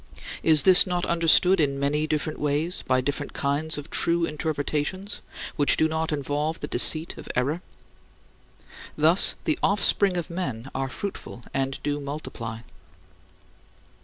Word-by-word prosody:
" - - -9
Is 155 -2 +6
this 190 0 +7
not 180 -1 -1
understood 170 +2 +4
in 140 -3 0
many 150 +2 0
different 155 0 -3
ways 150 +4 -1
by 130 0 +2
different 145 +2 -4
kinds 145 +3 -1
of 145 +2 -8
true 170 0 +2
interpretations 155 +5 -3 0.4
which 145 - +4
do 160 - +3
not 160 0 -2
involve 150 +2 -2
the - - -5
deceit 160 +1 +2
of - - -11
error? 145 +7 -1 1.4
Thus 160 +5 +4
the 155 - -1
offspring 200 -1 +2
of 170 -1 -4
men 130 -10 -4
are 135 0 -3
fruitful 185 -8 -7
and 135 0 -2
do 145 0 -2
multiply. 125 -6 -7
155 Hz, 140 wpm, -25 LUFS, 140-170 Hz, 1.4 s, this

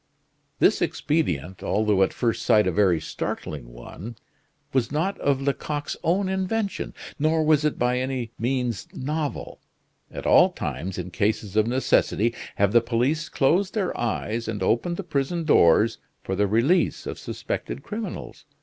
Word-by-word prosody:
This - - +3
expedient, 95 - -1
although 105 -2 +1
at 95 - +3
first 115 -2 -1
sight 105 -1 +4
a 95 - +1
very 90 -2 +3
startling 70 -5 -5
one, 90 - -9 0.6
was 130 -2 +1
not 165 +7 0
of 140 -2 +1
Lecoq's 145 +1 -2
own 185 +4 +2
invention, 190 +2 -2 0.2
nor 155 +2 +2
was 155 -1 +3
it 150 - 0
by 125 +1 +1
any 130 -3 -3
means 125 -2 -1
novel. 150 +2 -4 0.5
At - - -7
all - - +6
times, 95 +1 -4
in 90 0 -5
cases 105 0 -1
of 110 0 +3
necessity, 120 -2 +2 0.2
have 100 -1 +2
the 120 +1 +5
police 125 +7 0
closed 180 +9 +2
their 195 -4 -1
eyes 115 0 -2
and 105 -4 -3
opened 145 - +1
the 200 - -4
prison 160 +1 -1
doors 110 - +4 0.2
for 95 - -2
the 100 +1 +2
release 120 - +2
of - - -5
suspected - - -5
criminals. 215 +1 -6
125 Hz, 150 wpm, -25 LUFS, 105-155 Hz, 0.6 s, all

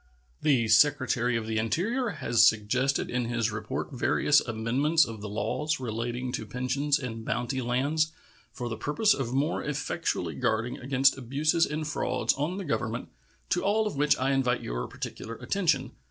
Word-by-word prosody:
The 130 -7 +3
Secretary 125 0 +3
of 115 - -4
the 110 0 -1
Interior 210 - 0
has 120 - +2
suggested 115 +5 +2
in 125 -1 0
his 120 -1 0
report 110 +6 -4
various 145 +2 +3
amendments 130 +8 +2
of 115 -3 -8
the 105 - -5
laws 115 +9 -1
relating 120 +1 -3
to 110 - -4
pensions 135 +5 0
and 115 -5 -6
bounty 120 +4 -2
lands 140 +6 +1 0.4
for 125 - -5
the 110 -2 -4
purpose 180 +9 +2
of 130 -4 -3
more 140 +5 0
effectually 150 -2 -2
guarding 110 +2 -1
against 135 +1 +2
abuses 150 +6 +1
and 155 +1 -3
frauds 130 -4 0
on 150 +7 -2
the 195 - -5
Government, 115 -6 -2 0.4
to 175 - +1
all 215 +2 +2
of 210 - -3
which 145 +1 +3
I 135 +1 +1
invite 125 -2 +1
your - - -3
particular 115 - -7
attention. 160 - 0
130 Hz, 165 wpm, -28 LUFS, 115-150 Hz, 0.4 s, The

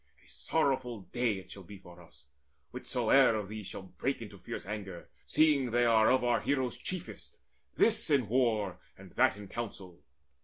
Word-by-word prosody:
A - - -24
sorrowful 130 -8 -1
day 120 -2 +1
It 95 -1 -11
shall 100 - -9
be 100 +2 -11
for 90 -2 -15
us, 85 - -19 0.5
whichsoe'er 135 -4 +3
of 105 -3 -4
these 105 -2 -7
Shall - - -7
break 135 +8 -3
into 105 -4 -10
fierce - - -7
anger, 100 -3 -7 0.2
seeing 150 -5 +3
they 120 +1 +2
Are 110 -2 +5
of 130 -1 +3
our 120 -1 +2
heroes 130 -3 -1
chiefest, 185 -2 -7 0.4
this 220 -3 +2
in 135 -7 +3
war, 110 -6 +1 0.2
And - - -13
that - - +3
in 105 -1 -9
counsel. 95 -6 -7
115 Hz, 170 wpm, -31 LUFS, 100-130 Hz, 0.5 s, Are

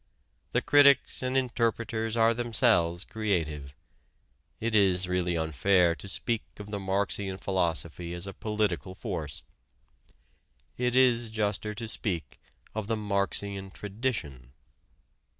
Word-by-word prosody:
The - - +1
critics 140 -1 +5
and 130 +1 0
interpreters 115 -2 -1
are 115 0 +4
themselves 110 -7 +2
creative. 80 -10 -2 0.8
It 115 0 -2
is 95 -3 +4
really 90 -1 0
unfair 85 +3 +3
to 90 - -10
speak 115 +3 0 0.2
of 105 0 -9
the 100 - -2
Marxian 95 0 0
philosophy 85 -3 -2
as 85 +1 -5
a 95 - -6
political 100 -6 -2
force. 85 - -5 1.3
It 125 0 0
is 120 -3 +4
juster 105 -1 -2
to 115 +1 -5
speak 85 - -3 0.3
of 110 -2 -4
the 115 0 0
Marxian 100 -1 -1
tradition. 95 - -4
100 Hz, 115 wpm, -28 LUFS, 90-115 Hz, 1.3 s, critics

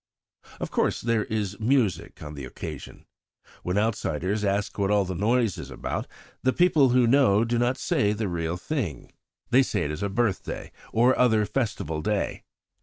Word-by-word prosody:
"Of - - -4
course, - - +1
there 115 -2 0
is 105 -2 -3
music 110 - 0
on 75 0 -7
the 70 -2 -7
occasion. 65 - -8 0.6
When 90 +2 -2
outsiders 105 -2 0
ask 100 +1 -1
what 100 -1 +1
all 105 -1 +3
the 95 - -3
noise 110 +3 +1
is - - -7
about, - - -4 0.3
the 130 - +3
people 160 -7 +4
who 125 0 +4
know 115 -4 +4
do 120 0 0
not 120 +2 +1
say 105 - +1
the 105 0 -2
real 85 -1 -2
thing. 95 - -4 0.4
They 130 - +6
say 130 - 0
it 75 - -2
is 75 +5 -5
a 100 - -1
birthday 105 -1 -2 0.2
or 120 +3 +4
other 110 -4 +4
festival 105 - -2
day. 105 +4 -1
105 Hz, 175 wpm, -26 LUFS, 95-120 Hz, 0.6 s, They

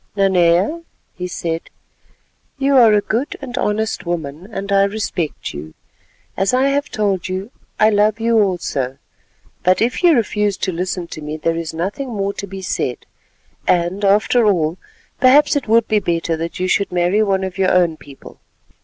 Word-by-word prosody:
"Nanea," 190 - +2 0.3
he 180 0 -5
said, 165 -2 -4 0.9
"you 275 0 +2
are 235 -4 +7
a 210 -1 +4
good 235 +7 -2
and 255 -3 -7
honest 220 -3 -1
woman, 170 +1 -5
and 200 -1 -5
I 195 0 +4
respect 200 -6 -3
you. 75 +2 -9 0.6
As 195 +5 +1
I 265 +2 +3
have 285 +1 -1
told 200 -4 -1
you, 190 +5 -4 0.3
I 215 +1 +5
love 210 +1 +2
you 230 0 +2
also, 155 -10 -1 0.6
but 185 +1 +3
if 240 +2 0
you 350 -2 +6
refuse 210 -4 0
to - - -2
listen 180 +1 -3
to 155 - -8
me 150 +1 -5
there 165 +1 -1
is 165 -1 -4
nothing 195 +11 -4
more 200 -3 -2
to 200 - -6
be 195 0 -8
said, 130 -8 -3 0.6
and 180 +3 +1
after 210 +3 +3
all, 170 -3 +1 0.4
perhaps 275 +4 +5
it 285 -5 -1
would 225 +1 +3
be 215 - +2
better 170 -3 -1
that 165 +3 -5
you 185 - 0
should 200 +2 +1
marry 180 +4 +2
one 195 -2 +1
of 190 0 -5
your 190 -1 +3
own 175 -3 +3
people. 140 -3 -14
195 Hz, 175 wpm, -19 LUFS, 175-220 Hz, 0.9 s, are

